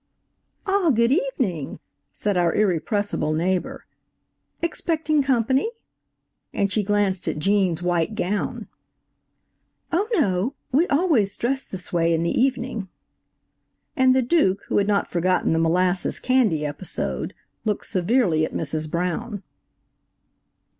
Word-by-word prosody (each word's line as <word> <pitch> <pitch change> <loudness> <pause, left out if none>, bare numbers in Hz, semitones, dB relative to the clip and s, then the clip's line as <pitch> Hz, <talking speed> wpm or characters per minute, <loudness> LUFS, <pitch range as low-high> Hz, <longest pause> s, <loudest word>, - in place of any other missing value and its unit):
"Ah, 390 -4 +2
good 235 -2 +3
evening," 260 - -1 0.3
said 205 -2 -2
our 175 -1 +2
irrepressible 205 -3 0
neighbor; 180 +3 -1 0.8
"Expecting 315 -2 0
company?" 265 - +1 0.8
and 200 -1 0
she 215 - +1
glanced 205 -2 0
at - - -1
Gene's 185 0 +1
white 175 +3 0
gown! 205 0 -2 1.2
"Oh, 385 +6 0
no; 195 - +1 0.2
we 310 +8 +3
always 280 - +2
dress 265 +3 0
this 185 -4 -6
way 165 -1 +2
in 165 - 0
the 170 - 0
evening." 250 -6 -1 1.1
And 260 -2 +4
the 260 - +3
Duke, 235 - +2
who - - +2
had 200 - +1
not 205 -1 +1
forgotten 180 0 +1
the 160 - +1
molasses 180 +3 +1
candy 230 - +2
episode, 145 +5 -4 0.3
looked 215 -2 -1
severely 185 -4 +2
at - - -2
Mrs. 155 0 -2
Brown. 185 +6 -3
205 Hz, 120 wpm, -23 LUFS, 175-260 Hz, 1.2 s, And